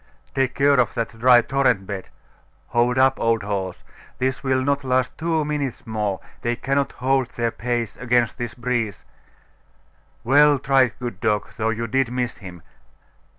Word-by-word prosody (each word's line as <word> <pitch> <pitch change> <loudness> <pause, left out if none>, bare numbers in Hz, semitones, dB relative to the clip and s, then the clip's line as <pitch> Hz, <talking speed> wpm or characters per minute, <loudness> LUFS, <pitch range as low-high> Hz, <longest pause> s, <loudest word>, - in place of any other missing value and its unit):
'Take 135 -2 0
care 140 -1 +4
of 120 - +1
that 115 -1 -4
dry 120 0 +6
torrent 125 -6 +1
bed! 95 -1 -6 0.6
Hold 120 +2 +2
up, 130 0 +4
old 115 -2 +1
horse! 95 -3 -4 0.3
This 130 +1 -1
will 130 -1 +1
not 140 +1 0
last 130 -1 0
two 160 -2 0
minutes 145 -4 -3
more. 105 -3 -2 0.2
They 120 0 0
cannot 135 +3 -1
hold 130 0 +1
their 115 -1 0
pace 120 -2 -3
against 120 0 +1
this 120 -1 -4
breeze.... 120 -5 -2 1.2
Well 145 +3 +5
tried, 135 -2 +3
good 120 -1 -6
dog, 105 -2 0
though 110 0 -1
you 115 +1 -2
did 130 +1 0
miss 125 -1 -2
him! 90 -5 -11
125 Hz, 155 wpm, -22 LUFS, 115-135 Hz, 1.2 s, dry